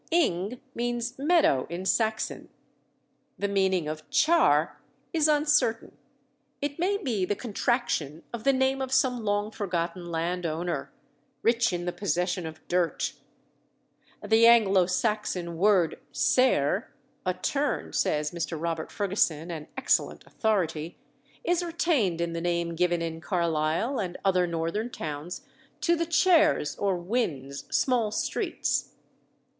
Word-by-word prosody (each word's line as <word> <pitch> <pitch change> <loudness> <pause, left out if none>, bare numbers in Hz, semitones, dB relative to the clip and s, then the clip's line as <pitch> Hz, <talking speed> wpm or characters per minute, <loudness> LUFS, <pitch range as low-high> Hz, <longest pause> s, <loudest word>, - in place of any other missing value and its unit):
"Ing" 240 - +1
means 240 +1 -3
meadow 295 - +3
in 175 +3 -5
Saxon. 220 +3 0 0.9
The 200 - -1
meaning 190 -4 +1
of 155 0 -6
"Char" 150 - +3 0.3
is 315 -2 +3
uncertain; 295 -6 +2 0.6
it 285 +2 -3
may 390 +4 +1
be 245 - -1
the 195 +3 0
contraction 200 - -1
of 230 -2 -5
the 275 - +5
name 265 0 +1
of 260 -1 -3
some 255 -3 +2
long 205 0 0
forgotten 175 -3 -3
landowner, 165 -3 -2 0.5
"rich 235 0 +3
in 175 -1 -3
the 175 - -1
possession 180 -2 -1
of 155 0 -11
dirt." 175 -1 0 1.1
The 220 +2 +5
Anglo 200 -6 +5
Saxon 185 -3 -1
word 185 -2 +3
cerre 220 - +2 0.3
a 185 -1 -1
turn 280 +10 -1
(says 150 0 0
Mr. 165 -1 -4
Robert 165 -1 -3
Ferguson, 180 -5 0
an 155 -2 -6
excellent - - 0
authority), 170 -7 -1 0.5
is 355 -5 +1
retained 320 - 0
in 170 0 -1
the 165 - -3
name 170 -1 -1
given 175 0 +1
in 165 0 -5
Carlisle 170 - 0
and 180 -4 -3
other 180 -2 +3
northern 170 +7 -2
towns 155 -5 -6 0.4
to 340 - +3
the 335 0 -1
chares, 320 - +3
or 195 -2 0
wynds 170 - -3
small 245 -5 +2
streets. 215 - -2
190 Hz, 130 wpm, -27 LUFS, 170-240 Hz, 1.1 s, the